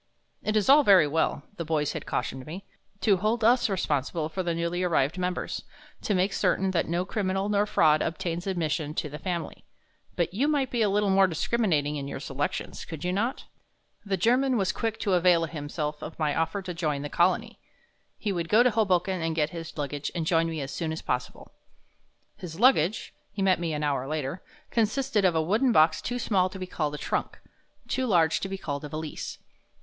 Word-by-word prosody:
"It 215 Hz, 0 st, 0 dB
is 210 Hz, -, +1 dB
all 285 Hz, +2 st, +8 dB
very 190 Hz, -, +7 dB
well," 145 Hz, -1 st, 0 dB
the 170 Hz, -, -2 dB
boys 155 Hz, -2 st, 0 dB
had -, -, -6 dB
cautioned 130 Hz, +1 st, -3 dB
me, 185 Hz, +6 st, -7 dB, 0.4 s
"to 200 Hz, -1 st, +4 dB
hold 215 Hz, +4 st, 0 dB
us 240 Hz, +1 st, +4 dB
responsible 155 Hz, -3 st, -1 dB
for 185 Hz, +4 st, -3 dB
the 170 Hz, -2 st, -1 dB
newly 170 Hz, +1 st, -1 dB
arrived 170 Hz, -2 st, +1 dB
members, 180 Hz, 0 st, -2 dB, 0.4 s
to 205 Hz, -, 0 dB
make 185 Hz, +2 st, +1 dB
certain 190 Hz, 0 st, +1 dB
that 170 Hz, -3 st, 0 dB
no 175 Hz, +2 st, -1 dB
criminal 195 Hz, 0 st, -1 dB
nor 205 Hz, 0 st, +2 dB
fraud 155 Hz, -7 st, +4 dB
obtains 170 Hz, +2 st, -3 dB
admission 160 Hz, -4 st, -1 dB
to 150 Hz, -, -2 dB
the 150 Hz, -, -7 dB
Family, 170 Hz, -1 st, -4 dB, 0.5 s
but 170 Hz, 0 st, -1 dB
you 260 Hz, +9 st, +1 dB
might 285 Hz, -4 st, +1 dB
be 240 Hz, -, 0 dB
a 210 Hz, -, +3 dB
little 205 Hz, 0 st, +2 dB
more 195 Hz, 0 st, +5 dB
discriminating 160 Hz, -5 st, 0 dB
in 140 Hz, -1 st, -4 dB
your 140 Hz, -, -5 dB
selections, 140 Hz, 0 st, -4 dB
could 160 Hz, -3 st, -8 dB
you 180 Hz, -, 0 dB
not?" 230 Hz, +7 st, -1 dB, 0.6 s
The 200 Hz, -2 st, -1 dB
German 250 Hz, +6 st, +3 dB
was 190 Hz, -3 st, +1 dB
quick 225 Hz, -1 st, -3 dB
to 200 Hz, -, +1 dB
avail 175 Hz, -2 st, +4 dB
himself 150 Hz, -1 st, -4 dB
of 160 Hz, -, -7 dB
my 150 Hz, -2 st, 0 dB
offer 165 Hz, +5 st, -1 dB
to 180 Hz, -1 st, -5 dB
join 150 Hz, -4 st, -2 dB
the -, -, -3 dB
Colony; 185 Hz, +9 st, +1 dB, 0.6 s
he 210 Hz, -, -2 dB
would 170 Hz, -3 st, -3 dB
go 220 Hz, +3 st, +6 dB
to 250 Hz, -, +3 dB
Hoboken 190 Hz, -4 st, +1 dB
and 165 Hz, 0 st, -1 dB
get 155 Hz, -1 st, +1 dB
his 165 Hz, -2 st, -8 dB
luggage 145 Hz, 0 st, -3 dB
and 165 Hz, -2 st, -1 dB
join 165 Hz, 0 st, +2 dB
me 160 Hz, -2 st, -4 dB
as 135 Hz, 0 st, -5 dB
soon 165 Hz, -2 st, -3 dB
as 160 Hz, -, -5 dB
possible. 125 Hz, 0 st, -4 dB, 0.8 s
His 165 Hz, -1 st, -8 dB
luggage 220 Hz, -, +3 dB, 0.2 s
he 200 Hz, -1 st, -3 dB
met 185 Hz, -3 st, +3 dB
me 170 Hz, -2 st, -2 dB
an 150 Hz, 0 st, -2 dB
hour 140 Hz, -3 st, 0 dB
later 155 Hz, +2 st, -3 dB, 0.3 s
consisted 230 Hz, 0 st, +1 dB
of 180 Hz, -3 st, +3 dB
a 160 Hz, -, +2 dB
wooden 220 Hz, +10 st, +2 dB
box 155 Hz, -4 st, +4 dB
too 245 Hz, -, -3 dB
small 190 Hz, -6 st, +1 dB
to 190 Hz, -, -9 dB
be 185 Hz, -, -4 dB
called 150 Hz, -5 st, -2 dB
a -, -, -5 dB
trunk, -, -, -2 dB, 0.5 s
too 260 Hz, -1 st, -1 dB
large 165 Hz, -6 st, +3 dB
to 195 Hz, -, -4 dB
be 195 Hz, -, -4 dB
called 145 Hz, -5 st, -4 dB
a 150 Hz, -, -6 dB
valise. 155 Hz, 0 st, -5 dB
175 Hz, 205 wpm, -27 LUFS, 155-200 Hz, 0.8 s, all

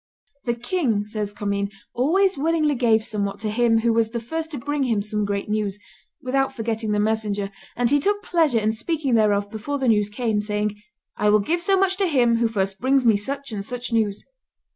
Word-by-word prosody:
"The 240 Hz, -1 st, 0 dB
king," 240 Hz, -, -1 dB
says 210 Hz, -1 st, -4 dB
Commynes, 200 Hz, -1 st, -2 dB, 0.2 s
"always 370 Hz, +10 st, +2 dB
willingly 310 Hz, 0 st, +1 dB
gave 225 Hz, -4 st, +2 dB
somewhat 200 Hz, -3 st, -3 dB
to 215 Hz, -1 st, -2 dB
him 225 Hz, 0 st, +3 dB
who 230 Hz, 0 st, +2 dB
was 225 Hz, -1 st, +2 dB
the 235 Hz, +1 st, -3 dB
first 320 Hz, +8 st, -4 dB
to 300 Hz, -, -5 dB
bring 290 Hz, +4 st, -2 dB
him 230 Hz, -4 st, +1 dB
some 210 Hz, 0 st, -1 dB
great 200 Hz, 0 st, -2 dB
news, 210 Hz, -2 st, -1 dB, 0.5 s
without 270 Hz, +1 st, +1 dB
forgetting 225 Hz, -3 st, -2 dB
the 210 Hz, -, +1 dB
messenger, 210 Hz, -2 st, -1 dB, 0.2 s
and 240 Hz, 0 st, +1 dB
he 290 Hz, -, +4 dB
took 410 Hz, +6 st, 0 dB
pleasure 320 Hz, -, +2 dB
in 215 Hz, 0 st, +2 dB
speaking 275 Hz, +4 st, -2 dB
thereof 205 Hz, -2 st, +2 dB
before 255 Hz, +7 st, -3 dB
the 265 Hz, -2 st, -1 dB
news 210 Hz, -3 st, +3 dB
came, 215 Hz, -1 st, -1 dB
saying, 210 Hz, 0 st, -2 dB, 0.4 s
'I 210 Hz, -, +2 dB
will 210 Hz, 0 st, +5 dB
give 335 Hz, +13 st, 0 dB
so 390 Hz, +2 st, +3 dB
much 385 Hz, 0 st, +2 dB
to 390 Hz, -1 st, +2 dB
him 245 Hz, -7 st, +3 dB
who 230 Hz, 0 st, +2 dB
first 195 Hz, -3 st, -2 dB
brings 265 Hz, 0 st, +2 dB
me 225 Hz, -2 st, +5 dB
such 275 Hz, +6 st, -4 dB
and 205 Hz, -2 st, -4 dB
such 245 Hz, +2 st, -5 dB
news. 210 Hz, -3 st, 0 dB
230 Hz, 205 wpm, -23 LUFS, 210-275 Hz, 0.5 s, will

